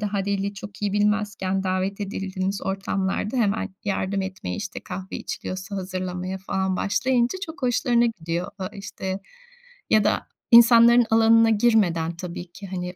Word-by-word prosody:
daha 205 -2 -1
dili 200 0 -1
çok 200 +1 -10
iyi 205 - 0
bilmezken 205 -2 0
davet 185 +2 -1
edildiğimiz 195 -1 -3
ortamlarda 195 +3 -2
hemen 210 -3 +1 0.2
yardım 195 -1 -1
etmeye, 190 +3 -5
işte 205 -3 -5
kahve 190 0 -6
içiliyorsa 190 +2 -5
hazırlamaya 185 0 -4
falan 190 0 -1
başlayınca 240 - +1
çok 320 -3 -10
hoşlarına 240 -1 +2
gidiyor. 175 -3 -3
A 185 -1 -3
işte, 195 -2 -6 0.7
ya 215 -1 +4
da - - 0 0.2
insanların 235 0 +8
alanına 225 0 +5
girmeden 200 -7 +2
tabii 175 0 -7
ki, 195 +3 -10
hani, 180 -1 -5
195 Hz, 140 wpm, -24 LUFS, 185-220 Hz, 0.7 s, insanların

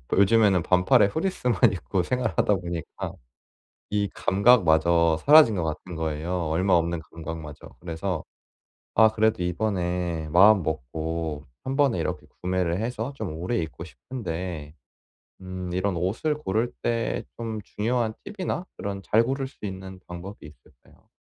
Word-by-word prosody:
요즘에는 100 -2 +4
반팔에 95 +6 +4
フリース만 125 - +1
입고 95 0 -1
생활하다 110 -2 +1
보니까 85 -3 -5 0.8
이 105 -1 +1
감각마저 85 -6 +4
사라진 150 -6 +8
것 90 - -1
같은 80 +3 -5
거예요, 80 +2 -2
얼마 90 +4 +2
없는 85 -1 +1
감각마저. 80 -3 -8
그래서 90 +2 -3 0.7
아 110 0 +7
그래도 110 -3 +1
이번에 90 -3 -1
마음먹고 80 - +2 0.2
한번에 135 -1 +1
이렇게 - - -3 0.2
구매를 90 -1 0
해서 120 +3 -3
좀 110 - -5
오래 90 +8 -2
입고 80 0 -5
싶은데 85 - -6 0.7
음 95 -1 -6
이런 95 0 0
옷을 105 - 0
고를 115 -3 -1
때 115 -1 -1
좀 115 -2 -4
중요한 115 +2 -1 0.2
팁이나 185 -2 -3
그런 100 -1 -4
잘 110 +4 +3
고를 135 +2 -2
수 130 - -11
있는 95 -1 -7
방법이 90 +2 -8
있을까요? 75 -1 -19
95 Hz, 300 characters per minute, -25 LUFS, 85-110 Hz, 0.8 s, 사라진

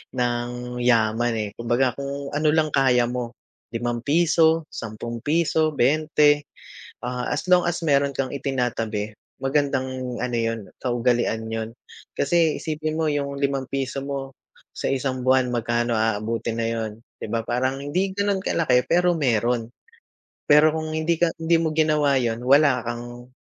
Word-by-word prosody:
ng 125 0 -2
yaman 120 -1 +2
eh. 105 -2 -2
Kumbaga, 120 +2 +1
kung 140 0 -5
ano 150 +1 0
lang 155 -1 +2
kaya 130 -3 +3
mo 120 -2 -4 0.4
₱5, 160 +7 +2
₱10, 145 +8 -1
20, 150 +2 +3 0.6
ah, 125 0 -3
as 150 - -2
long 180 -1 +4
as, 170 -1 -2
meron 140 -2 +2
kang 130 -2 -2
itinatabi, 115 -6 -2 0.2
magandang 130 -2 -1
ano 125 -1 -2
'yon, 115 0 -1 0.2
kaugalian 120 -2 0
'yon. 110 0 -3 0.5
Kasi 160 +1 +2
isipin 155 0 -3
mo 160 -2 +1
'yong 140 -1 -2
₱5 135 -1 -2
mo, 135 -1 -5 0.4
sa - - -2
isang 130 -1 -1
buwan 130 -1 +3
magkano 120 0 0
aabutin 110 +1 -1
na 115 - 0
'yon, 110 -2 -3 0.2
'di - - -4
ba, 115 -1 -1
parang 130 +2 0
hindi 180 +7 0
gano'n 200 -1 +1
kalaki, 130 -10 +2
pero 175 +1 +3
meron. 120 -5 0 0.8
Pero 150 +1 +6
kung 155 0 -3
hindi 160 +2 +1
ka 170 -1 +3
hindi 165 +1 +2
mo 160 -1 -1
ginawa 150 -3 +3
'yon, 115 -2 -1
wala 140 0 +5
kang 120 +1 -6
130 Hz, 140 wpm, -23 LUFS, 120-150 Hz, 0.8 s, Pero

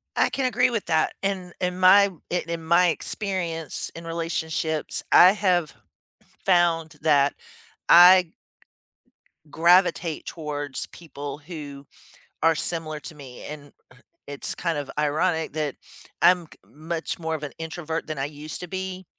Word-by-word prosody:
I - - +3
can 270 - -2
agree 250 0 +2
with 230 -4 -3
that, 160 -2 +1
in 190 -3 -3
in 180 0 -2
my 195 +2 +7 0.2
i 180 - 0
in 170 -1 -4
my 170 +2 +4
experience 170 -3 -2
in 165 0 -9
relationships, 160 -1 -2
I 185 +3 +8
have 180 -7 +1 0.7
found 165 -3 +2
that 145 -2 +3 0.5
I 175 0 +8 1.2
gravitate 170 -1 +2
towards 145 -4 -5
people 145 -4 -8
who 145 -3 -9 0.6
are 165 0 +4
similar 155 -3 -2
to 160 - -9
me, 135 -4 -11
and, 145 -1 -9 0.2
uh, - - -20 0.3
it's 140 -1 -4
kind 170 -3 -2
of 145 -2 -5
ironic 160 +2 0
that 150 -3 -2 0.5
I'm 180 -2 +4
k - - -17
much 165 +3 -5
more 160 -1 -2
of 150 - -7
an 145 - -5
introvert 160 0 -5
than 155 - -5
I 135 - -1
used 150 +1 -7
to 180 - -6
be, 190 0 -5
165 Hz, 145 wpm, -24 LUFS, 150-180 Hz, 1.2 s, I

